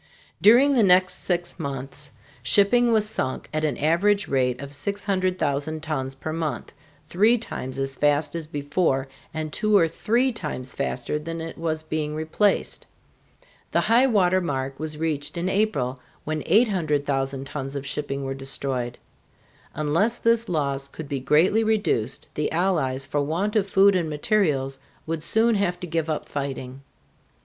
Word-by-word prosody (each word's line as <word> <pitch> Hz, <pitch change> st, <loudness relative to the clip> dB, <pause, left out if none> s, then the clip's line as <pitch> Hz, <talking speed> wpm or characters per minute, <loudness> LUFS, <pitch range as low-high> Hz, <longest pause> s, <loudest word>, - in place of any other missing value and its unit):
During 250 Hz, +7 st, +6 dB
the 250 Hz, -, +4 dB
next 185 Hz, -2 st, +5 dB
six 175 Hz, -1 st, -2 dB
months 140 Hz, 0 st, -5 dB, 0.3 s
shipping 205 Hz, -, +4 dB
was 215 Hz, -2 st, +3 dB
sunk 130 Hz, -10 st, -2 dB
at 155 Hz, 0 st, -1 dB
an 150 Hz, -5 st, 0 dB
average 195 Hz, +6 st, +2 dB
rate 125 Hz, -2 st, +1 dB
of 140 Hz, 0 st, -7 dB
600,000 180 Hz, -5 st, -1 dB
tons 135 Hz, -4 st, -3 dB
per 155 Hz, +3 st, -5 dB
month, 155 Hz, -7 st, -3 dB, 0.3 s
three 210 Hz, +9 st, +3 dB
times 130 Hz, -, -5 dB
as 135 Hz, 0 st, -1 dB
fast 145 Hz, +2 st, +1 dB
as 165 Hz, -2 st, -4 dB
before, 145 Hz, -2 st, 0 dB, 0.2 s
and 155 Hz, -1 st, -4 dB
two 215 Hz, -1 st, +3 dB
or 165 Hz, -4 st, +4 dB
three 235 Hz, +10 st, +1 dB
times 150 Hz, -, -5 dB
faster 140 Hz, +1 st, -2 dB
than 165 Hz, +2 st, -5 dB
it 165 Hz, 0 st, -6 dB
was 160 Hz, -1 st, -2 dB
being 155 Hz, -1 st, -3 dB
replaced. 160 Hz, +6 st, 0 dB, 0.9 s
The -, -, +4 dB
highwater 215 Hz, -7 st, +3 dB
mark 135 Hz, -5 st, -3 dB
was 155 Hz, -1 st, -4 dB
reached 150 Hz, -1 st, -2 dB
in 170 Hz, +2 st, -1 dB
April, 185 Hz, -11 st, 0 dB, 0.2 s
when 155 Hz, 0 st, -2 dB
800,000 145 Hz, -, +1 dB
tons 135 Hz, 0 st, -5 dB
of 140 Hz, 0 st, -4 dB
shipping 140 Hz, -1 st, -3 dB
were 135 Hz, 0 st, -3 dB
destroyed. 135 Hz, -2 st, -3 dB, 0.8 s
Unless 165 Hz, +10 st, +1 dB
this 230 Hz, -1 st, +1 dB
loss 140 Hz, -4 st, -1 dB
could 150 Hz, +2 st, -9 dB
be 140 Hz, -, -2 dB
greatly 160 Hz, -, +3 dB
reduced 210 Hz, -, 0 dB
the 150 Hz, -, -1 dB
Allies 155 Hz, -7 st, 0 dB
for 145 Hz, -, -1 dB
want 175 Hz, +9 st, -1 dB
of 200 Hz, -2 st, +1 dB
food 195 Hz, 0 st, +5 dB
and 170 Hz, -3 st, 0 dB
materials 150 Hz, -5 st, 0 dB, 0.3 s
would 160 Hz, 0 st, -3 dB
soon 225 Hz, +8 st, +2 dB
have 190 Hz, -4 st, 0 dB
to 180 Hz, -, -5 dB
give 165 Hz, -2 st, -2 dB
up 155 Hz, -, -2 dB
fighting. 135 Hz, -2 st, -5 dB
155 Hz, 155 wpm, -24 LUFS, 140-195 Hz, 0.9 s, During